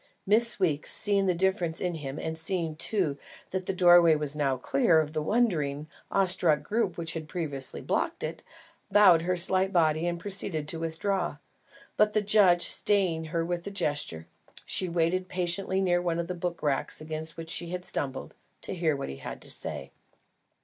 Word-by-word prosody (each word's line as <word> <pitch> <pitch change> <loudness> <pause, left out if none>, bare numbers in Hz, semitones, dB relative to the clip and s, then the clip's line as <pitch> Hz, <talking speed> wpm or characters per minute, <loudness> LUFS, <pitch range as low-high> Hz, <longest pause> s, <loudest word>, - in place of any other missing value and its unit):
Miss 225 +3 +3
Weeks, 155 -6 0
seeing 200 -2 +1
the 180 - +2
difference 180 -2 +1
in 180 -1 -2
him, 145 -3 -6
and 160 0 -4
seeing 165 -1 -1
too, 165 -4 -1 0.3
that 185 -1 -3
the - - +1
doorway 175 -3 +6
was 150 -1 -2
now 140 -3 0
clear 140 +5 +2
of 155 -1 -2
the 155 - -1
wondering, 155 -8 0 0.2
awestruck 180 -5 +2
group 210 -5 -1
which 165 -1 -3
had 160 -2 -6
previously 150 -6 -5
blocked - - -2
it, - - -5 0.5
bowed 195 -5 +6
her 180 +2 -1
slight 190 +2 +3
body 160 -2 +2
and 175 0 -2
proceeded 175 -5 -3
to 165 - -4
withdraw; 165 +1 -2 0.6
but 210 0 +3
the 215 - +2
judge, 195 -4 +5
staying 180 -5 +2
her 165 +1 -2
by 175 0 -2
a 200 - -5
gesture, 145 - -2 0.4
she 185 - 0
waited 170 +2 0
patiently 185 +1 -1
near 175 -2 +2
one 170 -2 -1
of 170 - -2
the 180 - -4
book 175 0 -5
racks 140 -2 -1
against 155 +1 -6
which 165 0 -6
she 170 - -2
had 180 0 -3
stumbled, 135 -2 -1 0.3
to - - -5
hear 165 -4 0
what 140 - -5
he 70 - -7
had - - -8
to - - -3
say. - - -4
170 Hz, 185 wpm, -28 LUFS, 155-185 Hz, 0.6 s, doorway